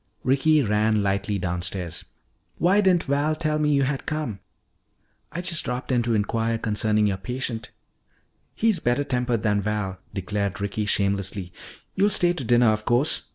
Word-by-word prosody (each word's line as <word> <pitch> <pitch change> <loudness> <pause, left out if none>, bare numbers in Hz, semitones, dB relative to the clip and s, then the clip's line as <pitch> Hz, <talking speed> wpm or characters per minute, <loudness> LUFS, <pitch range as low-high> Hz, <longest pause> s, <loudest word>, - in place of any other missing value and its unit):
Ricky 140 +3 +3
ran 105 -1 +2
lightly 100 +1 0
downstairs. 90 -1 -4 0.5
"Why 190 +4 +3
didn't 185 -4 +3
Val 145 +2 0
tell 155 -1 -1
me 150 -1 +2
you 140 - +3
had 135 0 -2
come?" 150 -10 -3 0.9
"I 170 +3 -4
just 175 -3 +1
dropped 125 +2 -4
in 125 -2 +3
to 115 -1 0
inquire 115 +2 0
concerning 105 -1 +1
your 100 -2 0
patient." 120 +1 -4 0.9
"He's 220 -5 +2
better 120 +1 +1
tempered 125 -4 -1
than 105 -2 +2
Val," 100 -2 -3
declared 100 +1 -3
Ricky 100 +1 -2
shamelessly. 100 -2 0 0.4
"You'll 200 +2 +3
stay 175 -3 +3
to 145 - -5
dinner 120 0 +4
of 110 0 0
course. 125 +6 +1
115 Hz, 155 wpm, -24 LUFS, 105-145 Hz, 0.9 s, dinner